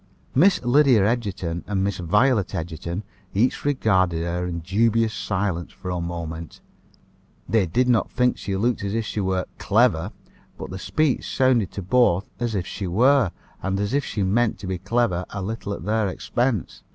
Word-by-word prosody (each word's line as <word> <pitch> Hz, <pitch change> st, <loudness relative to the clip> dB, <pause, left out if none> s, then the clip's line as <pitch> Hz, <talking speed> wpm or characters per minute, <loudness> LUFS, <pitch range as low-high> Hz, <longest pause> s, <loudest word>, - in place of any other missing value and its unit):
Miss 180 Hz, +8 st, +5 dB
Lydia 125 Hz, -4 st, +5 dB
Egerton 100 Hz, -7 st, -2 dB
and 95 Hz, -2 st, 0 dB
Miss 100 Hz, -2 st, -1 dB
Violet 105 Hz, +4 st, +2 dB
Egerton 85 Hz, +3 st, -4 dB, 0.3 s
each 115 Hz, +6 st, +1 dB
regarded 95 Hz, -, +2 dB
her 90 Hz, +1 st, -2 dB
in 85 Hz, -1 st, -4 dB
dubious 110 Hz, +5 st, +2 dB
silence 95 Hz, -4 st, -2 dB
for 90 Hz, -1 st, -7 dB
a 90 Hz, -1 st, -2 dB
moment. 85 Hz, -1 st, -6 dB, 0.9 s
They 110 Hz, -5 st, +2 dB
did 125 Hz, +10 st, +1 dB
not 120 Hz, -2 st, +2 dB
think 125 Hz, 0 st, +2 dB
she 100 Hz, -1 st, -3 dB
looked 115 Hz, +1 st, 0 dB
as 100 Hz, +1 st, -2 dB
if 115 Hz, -1 st, -1 dB
she 105 Hz, -, -3 dB
were 95 Hz, -2 st, 0 dB
"clever;" 100 Hz, -4 st, +2 dB, 0.5 s
but -, -, -7 dB
the 95 Hz, -, -6 dB
speech 155 Hz, +5 st, 0 dB
sounded 130 Hz, -7 st, +2 dB
to 100 Hz, -, -5 dB
both 100 Hz, -2 st, +2 dB
as 120 Hz, -3 st, -1 dB
if 90 Hz, -3 st, -1 dB
she 95 Hz, +1 st, -5 dB
were, 125 Hz, +4 st, +4 dB, 0.3 s
and 95 Hz, 0 st, -1 dB
as 100 Hz, +3 st, -1 dB
if 140 Hz, 0 st, +2 dB
she 105 Hz, -, -2 dB
meant 110 Hz, +4 st, +1 dB
to -, -, -9 dB
be 95 Hz, -1 st, -3 dB
clever 95 Hz, -2 st, 0 dB
a 100 Hz, -, -5 dB
little 105 Hz, 0 st, -4 dB
at 100 Hz, -, -5 dB
their 110 Hz, 0 st, +1 dB
expense. 120 Hz, +2 st, -2 dB
100 Hz, 175 wpm, -23 LUFS, 90-120 Hz, 0.9 s, Miss